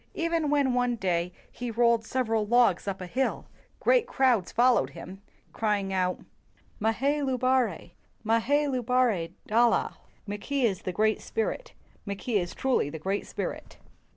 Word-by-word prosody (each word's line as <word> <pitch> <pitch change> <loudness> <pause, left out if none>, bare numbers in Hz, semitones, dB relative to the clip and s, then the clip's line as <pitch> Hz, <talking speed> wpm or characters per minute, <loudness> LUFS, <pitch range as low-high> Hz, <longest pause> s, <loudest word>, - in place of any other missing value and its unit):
Even 330 -2 0
when 285 -3 +2
one 245 -1 +1
day 180 -4 -1 0.2
he 245 -1 -5
rolled 235 0 +2
several 225 -4 0
logs 225 -4 +3
up 195 -1 -3
a - - -4
hill, 255 +9 -1 0.3
great - - +3
crowds 245 -8 +2
followed 240 - +3
him, 190 +2 -9 0.3
crying, 210 -3 0
"Mahay 185 -1 -1 1.0
lubare! 255 - 0 0.3
Makay 270 +7 +2
lubare 250 -8 +1
dala!" 235 +2 +2 0.3
["Mackay 210 +7 -3
is 195 -5 0
the 185 - -3
great 215 +3 +1
spirit; 225 - -3 0.3
Mackay 200 +2 -1
is 175 -1 -5
truly 260 - +1
the 160 - -6
great 195 +6 -3
spirit." - - -6
230 Hz, 135 wpm, -27 LUFS, 195-255 Hz, 1.0 s, logs